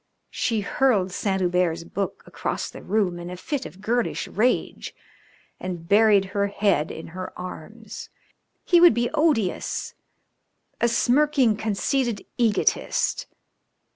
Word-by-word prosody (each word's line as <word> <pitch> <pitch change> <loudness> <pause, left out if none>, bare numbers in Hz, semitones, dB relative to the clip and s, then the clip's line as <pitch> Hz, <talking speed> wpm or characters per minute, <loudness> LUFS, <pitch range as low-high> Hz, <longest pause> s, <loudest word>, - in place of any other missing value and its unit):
She 225 -3 0
hurled 205 -4 +1
Saint 190 +1 -1
Hubert's 175 -2 +1
book 195 +2 -4
across - - -4
the - - -10
room 190 -4 0
in 175 0 -7
a 180 - -7
fit 275 - -3
of 190 - -15
girlish 235 +3 -1
rage 240 +5 -1 0.6
and 175 -2 -6
buried 205 -1 +5
her 200 0 +1
head 200 -6 +1
in 160 - -8
her 185 +2 -6
arms. 200 +5 -8 0.6
He 345 -1 +5
would 345 -10 +7
be 240 0 0
odious 300 - 0 0.9
a 235 - +4
smirking, 255 0 +3
conceited 220 +2 -1
egotist! 235 - +1
205 Hz, 125 wpm, -24 LUFS, 185-240 Hz, 0.9 s, would